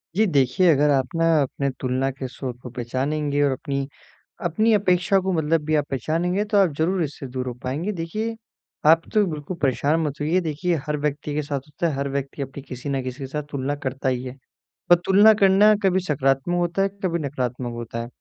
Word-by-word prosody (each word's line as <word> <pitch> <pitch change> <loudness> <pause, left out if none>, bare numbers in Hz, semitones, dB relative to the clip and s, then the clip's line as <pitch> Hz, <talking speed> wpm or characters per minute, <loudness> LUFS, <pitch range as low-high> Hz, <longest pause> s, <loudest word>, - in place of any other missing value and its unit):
जी, 220 - +4
देखिए, 145 - +2
अगर 145 +1 +3
आप 135 -2 +2
ना 165 - +2 0.2
अपने 140 +1 -1
तुलना 130 +1 0
के 130 0 -6
स्वर 130 0 -5
को 125 - -8
पहचानेंगे 140 +4 -1
और 140 - +3
अपनी 140 0 -3 0.6
अपनी 215 +7 +2
अपेक्षा 185 -1 +3
को 190 0 -1
मतलब 160 -1 +1
भी 155 0 +1
पहचानेंगे 170 - 0
तो 210 0 -1
आप 185 -5 +4
ज़रूर 175 +2 +1
इससे 145 -2 -5
दूर 130 0 -4
हो 120 - -4
पाएँगे। 155 +11 -2
देखिए 215 +7 -3 0.5
आप 165 +1 +6
तो 210 -1 +5
बिल्कुल 155 +2 -5
परेशान 140 +4 +2
मत 150 -2 -3
होइए। 165 +5 +2
देखिए 170 +2 -1
हर 150 0 -1
व्यक्ति 145 0 -2
के 150 - 0
साथ 140 -1 -3
होता 150 +3 -2
है, - - -1
हर 140 +1 -2
व्यक्ति 140 +1 -4
अपनी 135 +1 -7
किसी 130 +1 -8
न 135 -1 -1
किसी 130 +1 -6
के - - -3
साथ 150 +2 -4
तुलना 140 0 -2
करता 130 +1 -2
ही 125 -1 0
है। 130 +1 -7 0.6
और - - +11
तुलना 205 +3 +7
करना 200 +2 +6
कभी 190 -1 +3
सकारात्मक 135 +3 +1
होता 175 +2 0
है 195 - +2
कभी 170 -2 0
नकारात्मक 125 -2 -3
होता 115 0 -5
है। 115 - -6
150 Hz, 210 wpm, -23 LUFS, 135-175 Hz, 0.6 s, और